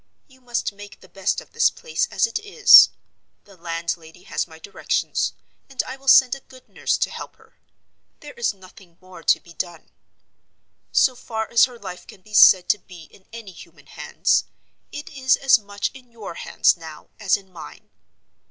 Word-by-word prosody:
You 260 -2 -23
must 240 -4 -3
make 205 0 -13
the - - -18
best 195 +2 -2
of - - -19
this - - +3
place 485 0 -3
as - - +1
it 460 -1 -4
is. 415 -1 +7 0.5
The 200 - -19
landlady 165 0 -6
has - - -3
my 160 -1 -15
directions; 200 - -2 0.4
and 270 -2 -2
I 260 - -8
will 270 0 -20
send 260 -2 +6
a 275 - -5
good 255 -1 -19
nurse - - -2
to - - -1
help - - -9
her. - - -26 0.6
There - - -11
is 475 0 -1
nothing 185 -3 -18
more 185 -2 -14
to - - +3
be 170 - -17
done. 170 -2 -7 1.0
So 255 - +3
far 220 -2 -5
as 235 - +6
her 250 -2 -12
life 180 -5 -10
can 190 - -15
be 210 +3 -18
said 185 -3 +7
to 210 - +2
be 175 -2 -14
in 190 - -22
any 225 -4 -10
human 175 - -16
hands, - - -1 0.5
it 295 - -8
is 260 -3 +2
as 265 -3 +4
much 205 -1 -4
in 250 -3 -16
your 225 -6 -9
hands - - +1
now 160 -3 -12
as 200 -3 +2
in 190 -2 -18
mine. 75 - -12
205 Hz, 190 wpm, -22 LUFS, 180-255 Hz, 1.0 s, is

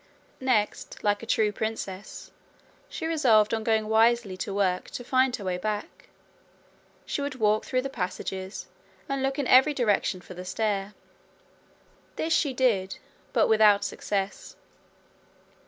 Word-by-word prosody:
Next, 245 -6 0
like 205 0 +1
a 230 - -9
true 215 -2 +2
princess, 205 -2 -5 0.6
she 320 - -5
resolved 235 -10 +3
on 220 -1 -1
going 220 -1 +1
wisely 225 -2 +3
to 200 - -4
work 190 -2 0
to 245 - -7
find 255 0 +2
her 205 - -8
way 180 -1 -2
back: 210 +2 -5 1.0
she - - -3
would 280 -1 -3
walk 215 -3 +1
through 255 0 0
the - - -2
passages, 190 -4 -5 0.4
and 275 -1 -2
look 270 0 -1
in 285 - -1
every 265 +4 +5
direction 210 -6 +1
for 180 - -12
the 180 0 -8
stair. 200 +1 -2 1.2
This 325 +1 -1
she 285 - +2
did, 225 -8 +1 0.3
but - - +3
without 210 -2 +5
success. 200 -1 -3
215 Hz, 140 wpm, -27 LUFS, 200-255 Hz, 1.2 s, every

